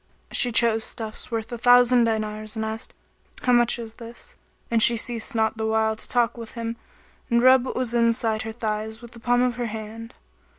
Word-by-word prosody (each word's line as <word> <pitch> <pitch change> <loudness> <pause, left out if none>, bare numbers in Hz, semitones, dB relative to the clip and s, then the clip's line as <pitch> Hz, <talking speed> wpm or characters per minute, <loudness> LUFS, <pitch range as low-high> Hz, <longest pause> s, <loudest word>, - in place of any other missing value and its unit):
She 245 - +3
chose 225 -1 +3
stuffs 220 -1 -6
worth 225 -1 -4
a 240 - -5
thousand 245 0 +5
dinars 215 -1 -3
and 220 0 -2
asked, 220 +1 -6 0.5
"How 250 - +3
much 240 0 +3
is 225 -2 -8
this?"; 235 - -10 0.4
and 230 -1 +3
she 235 +1 +6
ceased 235 +2 -2
not 220 0 +1
the 220 0 -2
while 220 0 +1
to - - -7
talk 240 -1 +1
with 230 -1 -9
him 230 -1 -4 0.5
and 235 -1 +3
rub 255 0 +6
what - - -5
was 250 -2 -2
inside 230 -2 +1
her 225 - -5
thighs 220 0 -4
with 235 - -11
the 235 - -13
palm 245 +1 +2
of 245 -1 -1
her 240 -1 -2
hand. 220 +1 -8
230 Hz, 205 wpm, -24 LUFS, 220-240 Hz, 0.5 s, she